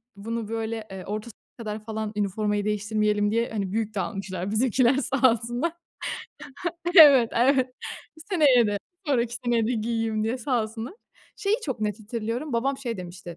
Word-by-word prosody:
bunu 225 +2 -4
böyle, 225 -1 -3
eee, 190 -1 -7
orta 215 +3 -4
sınıfa 225 - -20
kadar 215 -2 -5
falan 220 -1 -3
üniformayı 205 0 0
değiştirmeyelim 210 0 +1
diye, 230 +2 +1
hani, 200 -4 -3
büyük 220 0 -2
de - - 0
almışlar 190 -1 -3
bizimkiler 245 +3 +3
sağ 270 -2 +3
olsunlar. 240 +7 -1 1.3
Evet, 275 -8 +9
evet. 255 +1 +3 0.6
Seneye 280 - +5
de, 205 -1 -1 0.3
sonraki 240 -4 +1
seneye 235 -2 +2
de 240 - 0
giyeyim 225 -1 -1
diye 230 +4 -1
sağ 245 -2 0
olsunlar. 225 - -6 0.4
Şeyi 410 +2 +1
çok 260 -6 -3
net 210 0 -2
hatırlıyorum. 230 +6 -4
Babam 265 +4 0
şey 245 -4 -3
demişti: 175 -2 -8
225 Hz, 155 wpm, -26 LUFS, 210-245 Hz, 1.3 s, Evet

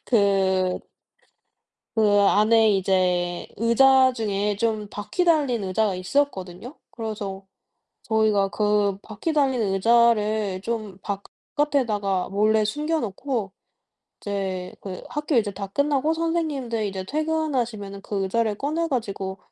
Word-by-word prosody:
그 190 -4 +2 1.2
그 - - +3 0.2
안에 220 +2 +4
이제 180 -2 +1
의자 260 +4 +5
중에 205 -2 -1
좀 215 -1 -1
바퀴 210 - -2
달린 285 -9 +2
의자가 195 +1 0
있었거든요. 190 - -2 0.2
그래서 205 -4 -5 0.6
저희가 215 -3 +2
그 205 0 +1
바퀴 215 +10 -4
달린 275 -5 +1
의자를 215 -1 +2
좀 215 -3 -4 0.6
바깥에다가 215 -11 0
몰래 215 +2 +2
숨겨놓고 250 - -2 0.7
이제 190 -3 -3
그 185 -2 -7
학교 295 0 -2
이제 215 -3 +2
다 195 +1 -5
끝나고 285 +7 +1
선생님들 305 -9 -1
이제 190 -1 -4
퇴근하시면은 255 -8 -2
그 195 0 -3
의자를 215 +3 0
꺼내 315 +7 -1
가지고 195 -7 -3
215 Hz, 250 characters per minute, -24 LUFS, 195-260 Hz, 1.2 s, 의자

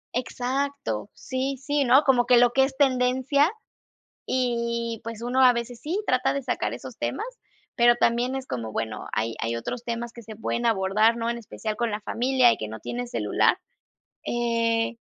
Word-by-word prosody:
Exacto, 255 - -2
sí, 265 +1 -3
sí, 285 +1 0
¿no?, 260 +4 +6
como 250 -4 +3
que 250 - +6
lo 240 0 +5
que 265 +2 +4
es 265 0 -7
tendencia, 260 +3 +3 0.7
y 235 -2 -1
pues, 230 -1 -7
uno 250 +2 +2
a 250 - +8
veces 235 0 -5
sí 340 +7 -2
trata 255 0 +2
de 280 - -2
sacar - - -2
esos - - -9
temas, 435 - -2 0.5
pero 240 0 +5
también 240 +2 +1
es 265 -1 -4
como, 115 -3 -4
bueno, 110 -1 -4
hay 110 +1 -1
hay 115 0 -1
otros 230 - -5
temas 235 0 -4
que 235 - -10
se 220 -1 -10
pueden 235 +2 -2
abordar, 215 +1 +3
¿no?, 230 0 -1
en 235 - -2
especial 215 -1 -5
con 235 0 -1
la 210 - -2
familia 250 +3 +3
y - - -7
que 110 - -5
no 110 +1 -7
tiene 245 - -4
celular, 240 - +2 0.7
eh, 230 -1 0
240 Hz, 185 wpm, -25 LUFS, 230-260 Hz, 0.7 s, a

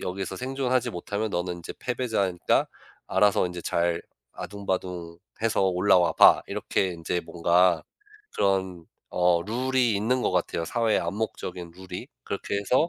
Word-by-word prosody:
여기서 95 +1 -4
생존하지 130 -1 0
못하면 100 +5 -3
너는 90 -1 -2
인제 85 - -8
패배자니까 110 -8 0 0.4
알아서 105 -2 +3
인제 90 -1 -6
잘 85 0 0 0.3
아등바등해서 95 +1 -3
올라와 90 -2 +3
봐.' - - +7
이렇게 95 - -1
인제 85 0 -2
뭔가 85 +1 +2 0.5
그런 95 -3 0 0.3
어 90 -1 +3
룰이 125 +2 +1
있는 125 +5 +1
것 - - +1
같아요 85 -2 -1
사회의 115 +1 +1
암묵적인 90 -5 -4
룰이. 90 0 -8 0.2
그렇게 - - -3
해서 125 - +2
95 Hz, 310 characters per minute, -26 LUFS, 85-110 Hz, 0.5 s, 봐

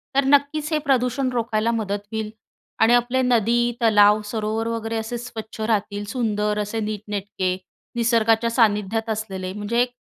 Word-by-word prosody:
तर 275 - +4
नक्कीचं 290 +3 +2
हे - - +2
प्रदूषण 255 0 +1
रोखायला 230 -1 0
मदत 205 -3 -2
होईल 220 -1 -3 0.5
आणि 230 +2 +6
आपले 245 +2 +2
नदी, 240 -1 +2
तलाव, 210 -2 +5
सरोवर 220 +1 -2
वगैरे 225 0 -3
असे 225 +2 -3
स्वच्छ 225 -2 -8
राहतील. 205 -2 -1
सुंदर 210 -3 -1
असे 210 +2 -2
नीटनेटके 205 -3 -3 0.4
निसर्गाच्या 230 -1 +2
सान्निध्यात 220 -1 +1
असलेले 195 -4 -4
म्हणजे 210 +4 0
एक 245 0 0
225 Hz, 145 wpm, -22 LUFS, 210-240 Hz, 0.5 s, आणि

